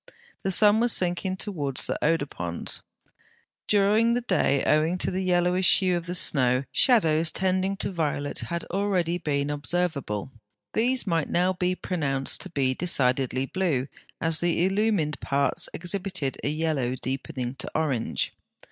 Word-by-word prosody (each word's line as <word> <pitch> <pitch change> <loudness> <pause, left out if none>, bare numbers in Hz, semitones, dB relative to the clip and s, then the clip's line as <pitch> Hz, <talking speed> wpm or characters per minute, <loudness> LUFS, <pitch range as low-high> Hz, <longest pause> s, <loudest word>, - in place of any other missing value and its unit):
The 195 - 0
sun 210 +3 +6
was 240 +1 +3
sinking 185 +1 0
towards 145 - -2
the - - -3
Oder 165 -3 +2
ponds. 85 -10 -4 0.9
During 210 +3 +3
the 245 - 0
day, 140 - +1
owing 155 +4 +2
to - - 0
the 185 +1 -2
yellowish 180 0 +3
hue 185 -2 +1
of 170 -1 -4
the 180 - -1
snow, 130 -6 +4
shadows 165 -10 +3
tending 190 +1 -1
to - - -2
violet 150 -4 -2
had 170 0 -4
already 180 -3 0
been 145 -3 -1
observable; 145 - -2 0.4
these 250 +3 +2
might 165 -5 -1
now 180 +2 +1
be 180 0 -1
pronounced 140 -8 -1
to - - -5
be 135 -5 0
decidedly 130 -4 0
blue, 145 -6 -1 0.3
as 165 -1 +1
the 175 0 +1
illumined 195 -6 0
parts 140 0 0
exhibited 180 -5 -2
a - - 0
yellow 150 -5 -1
deepening 130 -1 -4
to - - -2
orange. 140 -7 -1
170 Hz, 145 wpm, -26 LUFS, 140-185 Hz, 0.9 s, sun